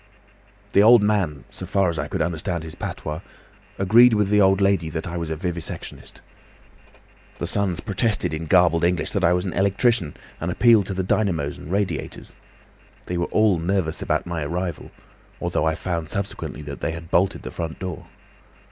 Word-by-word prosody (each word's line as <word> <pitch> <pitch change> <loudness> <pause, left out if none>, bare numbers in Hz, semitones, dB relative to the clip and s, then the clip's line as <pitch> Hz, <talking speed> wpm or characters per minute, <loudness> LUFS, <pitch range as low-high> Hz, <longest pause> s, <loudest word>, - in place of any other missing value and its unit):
"The 100 - +6
old 115 +1 +7
man, 95 -9 0
so 95 - -8
far 100 0 +2
as 85 -2 -2
I - - -2
could - - -1
understand 85 0 -2
his 80 -1 -8
patois, 75 +2 -5 0.6
agreed 115 +5 +6
with 105 -2 +2
the 105 0 +4
old 95 0 +4
lady 100 -5 +2
that 80 0 -4
I 85 -1 -5
was 85 -2 -3
a 80 - -2
vivisectionist. 85 0 -6 1.2
The - - -3
sons 95 -4 0
protested 105 -2 0
in 80 +1 -4
garbled 85 -1 +4
English 90 0 +1
that 100 - -1
I 85 +1 +5
was 90 +1 0
an 95 - -3
electrician, 100 - +1 0.2
and 85 - -3
appealed 110 +1 +4
to 95 - -3
the 95 - -1
dynamos 90 -7 0
and 80 - -9
radiators. 95 -7 -3 0.7
They 90 -1 -3
were 85 - +1
all 105 -5 +3
nervous 85 -1 -1
about - - 0
my 85 -3 -3
arrival, 85 +2 -4 0.5
although 75 - -1
I 80 0 +1
found 85 -2 -3
subsequently 100 -6 -4
that 70 -1 -7
they 80 - -2
had 85 +1 -9
bolted 95 +3 +1
the - - -6
front 80 -2 -5
door. 90 -2 -6
90 Hz, 185 wpm, -23 LUFS, 80-100 Hz, 1.2 s, old